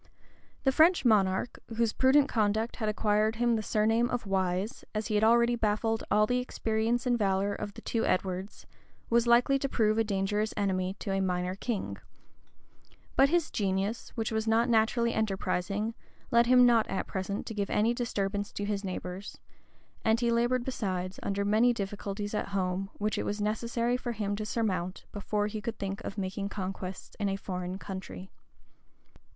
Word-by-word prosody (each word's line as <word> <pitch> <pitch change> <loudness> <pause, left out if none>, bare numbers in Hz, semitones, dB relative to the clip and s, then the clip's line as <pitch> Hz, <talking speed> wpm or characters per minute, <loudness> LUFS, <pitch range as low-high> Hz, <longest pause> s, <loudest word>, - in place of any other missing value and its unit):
The 270 - +4
French 320 +2 +4
monarch, 200 -1 +2 0.2
whose 230 -2 +2
prudent 270 +2 +4
conduct 220 +1 0
had 215 -3 -1
acquired 215 +1 +1
him 240 0 +2
the 220 - -1
surname 225 +3 +2
of 245 -3 -2
Wise, 190 +3 -1
as 215 0 -1
he 220 - -2
had 210 +1 +2
already 235 +1 +5
baffled 225 0 0
all 210 +1 +4
the 245 +3 +1
experience 230 -1 -1
and 245 -1 +2
valor 195 0 +1
of 205 0 -6
the - - -9
two 230 - -1
Edwards, 185 +1 -2 0.5
was 235 0 +3
likely 245 +4 +4
to 275 - -2
prove 215 -2 +2
a - - +4
dangerous 210 +1 -1
enemy 190 -1 0
to 200 - -4
a 195 0 +1
minor 180 -1 -1
king: 205 +2 -3 1.2
but 275 - +5
his 340 -1 +1
genius, 200 +2 -1
which 225 -1 -2
was 220 0 -1
not 225 +2 +3
naturally 235 +1 +2
enterprising, 200 +1 -1 0.4
led 235 0 +5
him 250 0 +7
not 235 -2 +4
at 195 - -2
present 195 +1 -4
to - - -5
give 200 -2 -2
any 225 +3 +2
disturbance 205 -4 -2
to 205 - -3
his 205 -1 -2
neighbors; 185 +1 -6 0.7
and 220 +1 +3
he 235 -1 +1
labored, 240 +1 +1
besides, 185 -7 -3
under 200 0 -1
many 220 +4 +4
difficulties 205 0 -4
at 210 - -1
home, 195 0 -1
which 210 0 -1
it - - -1
was 205 +1 -3
necessary 230 +3 0
for 245 -1 -4
him 205 -2 -2
to 215 +1 -4
surmount, 190 -5 -2
before 205 0 -1
he 210 0 -4
could 230 0 -4
think 195 0 -4
of 200 - -6
making 195 +1 -3
conquests 190 -1 -6
in 200 -1 +1
a 195 - -1
foreign 185 -1 -4
country. 190 -1 -8
210 Hz, 175 wpm, -29 LUFS, 195-235 Hz, 1.2 s, him